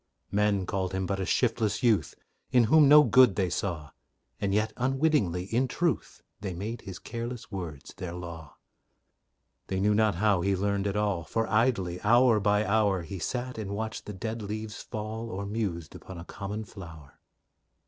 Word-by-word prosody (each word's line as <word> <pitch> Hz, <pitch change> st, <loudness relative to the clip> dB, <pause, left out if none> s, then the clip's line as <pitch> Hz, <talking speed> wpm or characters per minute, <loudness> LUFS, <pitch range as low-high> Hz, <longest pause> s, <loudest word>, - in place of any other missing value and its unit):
Men 100 Hz, -2 st, +2 dB
called 95 Hz, -1 st, -2 dB
him 95 Hz, 0 st, -1 dB
but 95 Hz, +2 st, -2 dB
a 95 Hz, -, -2 dB
shiftless 115 Hz, -3 st, +1 dB
youth, 115 Hz, -4 st, +2 dB, 0.4 s
In 125 Hz, -2 st, +5 dB
whom 145 Hz, +5 st, +6 dB
no 150 Hz, +1 st, +9 dB
good 130 Hz, -8 st, +6 dB
they 95 Hz, -3 st, 0 dB
saw; 80 Hz, -8 st, -3 dB, 0.5 s
And 100 Hz, -, 0 dB
yet, 110 Hz, +2 st, +1 dB
unwittingly, 130 Hz, -, +1 dB
in 130 Hz, +3 st, +2 dB
truth, 170 Hz, +6 st, -2 dB, 0.2 s
They 95 Hz, -3 st, -4 dB
made 110 Hz, +7 st, -5 dB
his 95 Hz, -2 st, -8 dB
careless 115 Hz, 0 st, -6 dB
words 80 Hz, -8 st, -6 dB
their 90 Hz, -3 st, -5 dB
law. 85 Hz, -3 st, -8 dB, 1.1 s
They 95 Hz, -, -2 dB
knew 105 Hz, +2 st, +3 dB
not 110 Hz, -2 st, +3 dB
how 100 Hz, -1 st, +2 dB
he 100 Hz, +2 st, +1 dB
learned 100 Hz, +1 st, 0 dB
at 100 Hz, 0 st, -1 dB
all, 100 Hz, -5 st, 0 dB
For 115 Hz, +7 st, -1 dB
idly, 105 Hz, -6 st, +1 dB
hour 120 Hz, +1 st, +5 dB
by 105 Hz, +1 st, +2 dB
hour, 100 Hz, -4 st, +2 dB
He 90 Hz, +4 st, -7 dB
sat 125 Hz, +5 st, -3 dB
and 100 Hz, -2 st, -4 dB
watched 110 Hz, +1 st, -5 dB
the 105 Hz, -, -5 dB
dead 110 Hz, +4 st, -4 dB
leaves 105 Hz, +1 st, -5 dB
fall, 110 Hz, +2 st, -5 dB
Or 100 Hz, -1 st, -4 dB
mused 100 Hz, -7 st, -3 dB
upon 95 Hz, -, -10 dB
a 85 Hz, -, -8 dB
common 105 Hz, +3 st, -5 dB
flower. 85 Hz, -9 st, -12 dB
105 Hz, 175 wpm, -28 LUFS, 95-115 Hz, 1.1 s, no